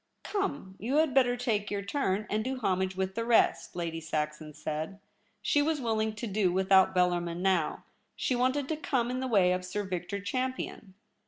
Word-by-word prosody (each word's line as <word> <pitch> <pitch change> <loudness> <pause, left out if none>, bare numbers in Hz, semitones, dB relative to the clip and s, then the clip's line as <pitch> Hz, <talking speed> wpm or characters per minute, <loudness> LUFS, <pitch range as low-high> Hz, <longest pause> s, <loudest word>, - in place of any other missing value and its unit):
* - - -48
Come, 285 - -3
you 245 +7 -1
had 310 -3 +3
better 245 -2 +4
take 215 -4 0
your 200 -1 -2
turn, 210 -3 0
and 215 +1 0
do 260 +2 -2
homage 190 -4 0
with 190 0 -1
the 230 - -2
rest,' 230 -5 +2
Lady 165 -2 -3
Saxon 155 -1 -3
said. 155 +5 -4 0.4
She 290 - +3
was 310 +1 +1
willing 220 -3 0
to 215 - -4
do 200 -3 +1
without 190 0 +4
Bellarmin 175 -1 +1
now; 185 -5 +1 0.3
she 255 - 0
wanted 260 +3 +1
to 315 - -1
come 250 -5 0
in 255 - -2
the 260 - -2
way 195 -7 +4
of 180 0 0
Sir 205 +3 -3
Victor 185 +1 -3
Champion. 255 -3 -3
200 Hz, 190 wpm, -30 LUFS, 180-250 Hz, 0.4 s, better